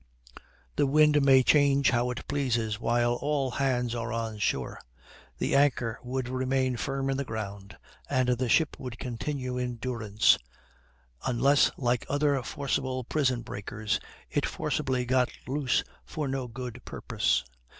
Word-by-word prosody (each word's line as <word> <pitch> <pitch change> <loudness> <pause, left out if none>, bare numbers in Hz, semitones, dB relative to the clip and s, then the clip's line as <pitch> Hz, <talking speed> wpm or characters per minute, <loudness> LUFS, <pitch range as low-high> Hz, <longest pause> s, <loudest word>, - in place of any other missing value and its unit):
The 145 - +3
wind 150 +1 +5
may 135 -1 +6
change 140 -1 +4
how 120 0 +1
it 125 - -5
pleases 115 -6 0
while 120 +1 +2
all 140 +1 -1
hands 125 -2 0
are 115 -1 -3
on 110 -2 -3
shore; 65 -10 -1 0.6
the - - 0
anchor 130 -5 +2
would 125 0 -3
remain 130 0 0
firm 135 +2 -2
in 135 0 0
the 140 - -1
ground, 100 -5 -6 0.3
and 130 -2 +2
the 125 0 +1
ship 160 +3 +3
would 125 -2 -6
continue 125 +1 -3
in 125 -1 -2
durance, 115 -3 +2 0.9
unless, 135 +3 +4
like 125 -2 0
other 145 -1 +2
forcible 130 0 -2
prison 130 -2 0
breakers, 105 0 -3 0.3
it - - +1
forcibly 125 -1 -1
got 125 0 +2 0.2
loose 135 -1 +1 0.2
for 150 -2 -4
no 135 -1 -2
good 125 0 -7
purpose. - - 0
125 Hz, 140 wpm, -28 LUFS, 120-135 Hz, 0.9 s, may